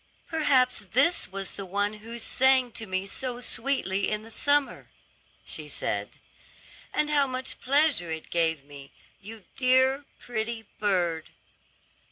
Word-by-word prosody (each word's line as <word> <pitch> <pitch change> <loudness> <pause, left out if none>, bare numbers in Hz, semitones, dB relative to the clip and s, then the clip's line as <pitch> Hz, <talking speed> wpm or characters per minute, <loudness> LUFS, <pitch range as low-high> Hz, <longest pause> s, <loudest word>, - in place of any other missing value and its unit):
"Perhaps 280 -6 +3
this 285 +8 +4
was 195 0 -5
the 200 - -6
one 205 +2 0
who 230 +2 -8
sang 260 +1 +3
to 220 -1 -6
me 185 0 -2
so 245 +4 -1
sweetly 230 -5 0
in 215 0 -2
the 225 - -12
summer," 285 +4 +1 0.6
she - - -4
said; - - -3 0.7
"and 300 0 0
how 285 -2 +4
much 255 0 -5
pleasure 280 - +3
it 160 -1 -6
gave 160 -4 +1
me, 140 -1 -13 0.3
you 215 0 -11
dear, 260 +2 +3
pretty 225 -1 -4
bird." 175 -6 0
230 Hz, 135 wpm, -27 LUFS, 195-265 Hz, 0.7 s, this